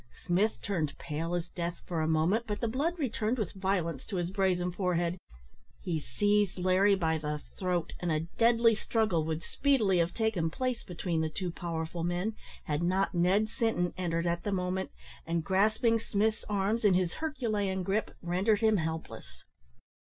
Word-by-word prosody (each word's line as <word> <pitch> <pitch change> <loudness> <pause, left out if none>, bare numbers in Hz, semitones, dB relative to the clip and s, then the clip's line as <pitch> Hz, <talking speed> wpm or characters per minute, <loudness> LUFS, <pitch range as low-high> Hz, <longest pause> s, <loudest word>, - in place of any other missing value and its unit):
Smith 200 +5 +2
turned 160 -8 -1
pale 165 +3 -3
as 175 0 -2
death 170 0 -4
for 170 -3 -2
a 155 - +1
moment, 165 +9 +2
but 210 -1 -2
the 235 - 0
blood 295 +10 -1
returned 240 -5 -1
with 210 -7 -2
violence 185 -7 -1
to 205 - -6
his 175 0 -1
brazen 185 -2 +1
forehead; 175 -1 0 0.6
he 170 -4 -2
seized 205 +8 +1
Larry 185 +2 +4
by 160 -4 0
the 150 0 -3 0.2
throat, 180 -3 -1
and 175 -1 -1
a 155 -1 +1
deadly 230 +6 +3
struggle 215 -6 +1
would 160 0 -2
speedily 225 -10 +2
have 170 +1 +2
taken 220 -8 +1
place 255 +7 -2
between 170 -2 -2
the 160 - 0
two 180 +2 -3
powerful 165 0 -4
men 175 +5 -1 0.3
had 150 +1 -1
not 185 +3 +1
Ned 185 +5 +3
Sinton 225 -7 0
entered 170 -2 -1
at 170 0 0
the 205 - -1
moment, 185 0 -1 0.4
and, 165 0 0
grasping 215 +6 +3
Smith's 215 0 0
arms 210 +3 0
in 200 -3 +5
his 180 -2 +1
Herculean 215 -11 -1
gripe, 200 +4 0
rendered 190 +5 +2
him 220 -1 +4
helpless. 160 -1 -5
185 Hz, 170 wpm, -30 LUFS, 170-215 Hz, 0.6 s, in